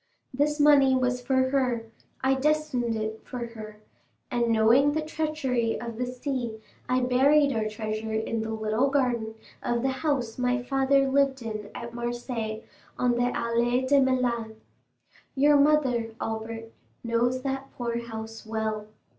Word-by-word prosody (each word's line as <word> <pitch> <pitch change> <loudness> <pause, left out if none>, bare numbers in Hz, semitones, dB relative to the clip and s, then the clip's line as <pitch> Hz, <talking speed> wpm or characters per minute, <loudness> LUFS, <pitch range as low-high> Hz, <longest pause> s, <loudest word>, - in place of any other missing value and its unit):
This 295 +3 +1
money 280 -3 +6
was 250 -1 0
for 260 +1 +1
her; 250 -4 +1 0.4
I 265 0 +4
destined 270 -4 0
it 220 0 -4
for 245 -2 -5
her, 215 -2 -9 0.5
and, 240 -2 +1
knowing 230 +6 +4
the 315 0 -1
treachery 305 -7 -1
of 235 -1 -6
the 250 - -1
sea 250 -3 -4 0.3
I 255 0 +2
buried 275 +3 +4
our 220 -1 0
treasure 215 0 -4
in 220 +1 -1
the 220 - -4
little 220 +4 0
garden 240 -5 0 0.3
of 240 0 -1
the 265 - +2
house 260 -7 -1
my 250 0 +1
father 270 +1 +2
lived 270 -1 +2
in 215 -2 -5
at 235 0 -7
Marseilles, 240 -2 -4 0.3
on 250 -1 +2
the 245 +1 +1
Allées 240 +2 0
de 280 +1 +5
Meilhan. 245 -4 0 0.8
Your 290 +2 +5
mother, 265 -6 +3
Albert, 225 0 -5 0.3
knows 240 +2 0
that 270 0 -3
poor 235 -1 -2
house 225 -1 -7
well. 220 -1 -3
245 Hz, 145 wpm, -27 LUFS, 225-270 Hz, 0.8 s, money